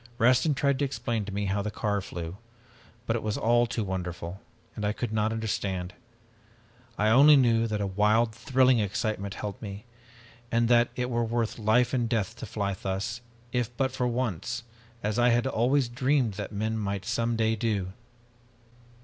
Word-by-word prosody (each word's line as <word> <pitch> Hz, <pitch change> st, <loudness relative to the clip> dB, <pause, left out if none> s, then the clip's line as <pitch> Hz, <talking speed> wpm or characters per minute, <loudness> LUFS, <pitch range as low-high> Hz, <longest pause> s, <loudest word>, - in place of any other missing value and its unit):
Rastin 130 Hz, +5 st, +4 dB
tried 140 Hz, -1 st, +1 dB
to 145 Hz, -, +2 dB
explain 115 Hz, -5 st, -2 dB
to 100 Hz, -, -6 dB
me 100 Hz, +1 st, -2 dB
how 100 Hz, +1 st, 0 dB
the 105 Hz, -, -2 dB
car 100 Hz, -1 st, -1 dB
flew, 85 Hz, -1 st, -6 dB, 0.7 s
but 115 Hz, -, 0 dB
it 115 Hz, -, -1 dB
was 105 Hz, -1 st, -2 dB
all 120 Hz, +1 st, +3 dB
too 115 Hz, -1 st, -2 dB
wonderful, 90 Hz, -1 st, -5 dB, 0.3 s
and 105 Hz, -, -5 dB
I 105 Hz, 0 st, +1 dB
could 115 Hz, -1 st, -4 dB
not 110 Hz, 0 st, +1 dB
understand. 100 Hz, -4 st, -2 dB, 1.0 s
I 105 Hz, +1 st, +2 dB
only 140 Hz, +6 st, +8 dB
knew 115 Hz, -3 st, +3 dB
that 105 Hz, -2 st, -2 dB
a -, -, 0 dB
wild 105 Hz, +4 st, +2 dB
thrilling 130 Hz, +2 st, +3 dB
excitement 100 Hz, -1 st, -2 dB
held 105 Hz, -1 st, -6 dB
me, 100 Hz, 0 st, -7 dB, 0.7 s
and 115 Hz, 0 st, +2 dB
that 120 Hz, -1 st, +5 dB
it 125 Hz, 0 st, -2 dB
were 120 Hz, 0 st, +1 dB
worth 115 Hz, 0 st, -1 dB
life 115 Hz, +4 st, +3 dB
and 120 Hz, -3 st, +1 dB
death 110 Hz, -2 st, -1 dB
to 115 Hz, -, -7 dB
fly 100 Hz, -2 st, -2 dB
thus, 95 Hz, +5 st, -3 dB, 0.3 s
if 120 Hz, -1 st, -2 dB
but 135 Hz, -1 st, +1 dB
for 125 Hz, -1 st, -1 dB
once, 120 Hz, -1 st, -2 dB, 0.4 s
as 105 Hz, +2 st, 0 dB
I 120 Hz, +1 st, +5 dB
had 120 Hz, +1 st, +2 dB
always 130 Hz, +1 st, +2 dB
dreamed 130 Hz, -1 st, +1 dB
that 100 Hz, +1 st, -6 dB
men 110 Hz, +2 st, -2 dB
might 100 Hz, -2 st, -3 dB
some 115 Hz, 0 st, 0 dB
day 110 Hz, 0 st, +2 dB
do. 100 Hz, -4 st, -1 dB
110 Hz, 180 wpm, -28 LUFS, 100-120 Hz, 1.0 s, only